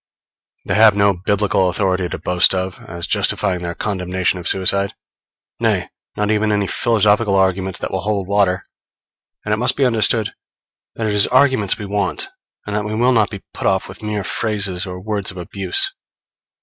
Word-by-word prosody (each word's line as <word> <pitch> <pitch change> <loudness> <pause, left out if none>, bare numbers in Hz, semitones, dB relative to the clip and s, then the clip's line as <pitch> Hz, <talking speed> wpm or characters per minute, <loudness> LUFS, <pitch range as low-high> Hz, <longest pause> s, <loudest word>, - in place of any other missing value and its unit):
They - - -1
have 110 -1 +6
no 100 0 +3
Biblical 95 0 +1
authority 90 -1 0
to - - -4
boast 90 +1 +3
of, 95 0 -3
as 85 0 -5
justifying 95 -3 0
their 85 -1 -4
condemnation 95 -2 -1
of 85 - -4
suicide; 100 +1 +2 0.6
nay, - - 0 0.3
not 105 0 0
even 105 0 +1
any 100 -1 +1
philosophical 105 -1 +2
arguments 95 0 +1
that - - -5
will 95 - -1
hold 100 -1 -2
water; 100 -2 +1 0.8
and 105 - 0
it - - +1
must 120 +2 +1
be 140 - +2
understood 115 -2 +2 0.6
that 115 - -3
it 105 - 0
is 105 -1 +4
arguments 130 -6 +3
we 105 - -6
want, 105 - -2 0.4
and 105 - -4
that 105 - 0
we 105 +1 -3
will 120 +3 +3
not 110 -3 +3
be 100 -2 -8
put - - -2
off 95 0 +1
with 95 - -11
mere 105 -2 -3
phrases 100 -5 -1
or 90 0 -6
words 100 0 -2
of 95 - -9
abuse. 100 - -1
100 Hz, 180 wpm, -19 LUFS, 95-105 Hz, 0.8 s, have